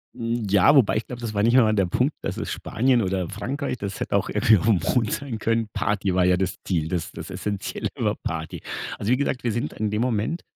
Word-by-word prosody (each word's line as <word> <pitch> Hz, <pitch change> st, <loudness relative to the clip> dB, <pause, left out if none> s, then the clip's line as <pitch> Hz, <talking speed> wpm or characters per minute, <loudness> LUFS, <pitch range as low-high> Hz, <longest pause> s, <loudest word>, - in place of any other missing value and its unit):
Hm, 115 Hz, -1 st, -2 dB
ja, 100 Hz, +9 st, +5 dB
wobei 125 Hz, -6 st, +4 dB
ich 110 Hz, -, -3 dB
glaube, 125 Hz, -1 st, -7 dB
das 115 Hz, -2 st, -4 dB
war 100 Hz, -, +1 dB
nicht 120 Hz, +3 st, +4 dB
einmal 110 Hz, -4 st, +5 dB
der 100 Hz, -3 st, +2 dB
Punkt, 125 Hz, -, +1 dB
dass -, -, -4 dB
es -, -, -4 dB
Spanien 125 Hz, +1 st, +1 dB
oder 95 Hz, -3 st, -1 dB
Frankreich, 130 Hz, +6 st, -3 dB
das 100 Hz, -3 st, -5 dB
hätte -, -, -1 dB
auch -, -, +1 dB
irgendwie 110 Hz, -1 st, +4 dB
auf 85 Hz, -, -2 dB
dem 105 Hz, -5 st, +4 dB, 0.2 s
Mond 115 Hz, -4 st, +2 dB
sein 130 Hz, -6 st, -3 dB
können. 115 Hz, +1 st, 0 dB
Party 100 Hz, -3 st, 0 dB
war 90 Hz, 0 st, +3 dB
ja 90 Hz, 0 st, +4 dB
das 95 Hz, 0 st, -1 dB
Ziel, 80 Hz, -4 st, -1 dB
das 85 Hz, -2 st, -3 dB
das -, -, -8 dB
Essenzielle 100 Hz, -2 st, -3 dB
war -, -, 0 dB
Party. 80 Hz, -1 st, -5 dB, 0.4 s
Also, 105 Hz, +4 st, -1 dB
wie 125 Hz, -, +4 dB
gesagt, 140 Hz, -2 st, -1 dB
wir 120 Hz, -, +1 dB
sind 120 Hz, +2 st, -2 dB
in 110 Hz, 0 st, -2 dB
dem 105 Hz, +2 st, -1 dB
Moment 125 Hz, +7 st, -1 dB
110 Hz, 245 wpm, -24 LUFS, 95-120 Hz, 0.4 s, ja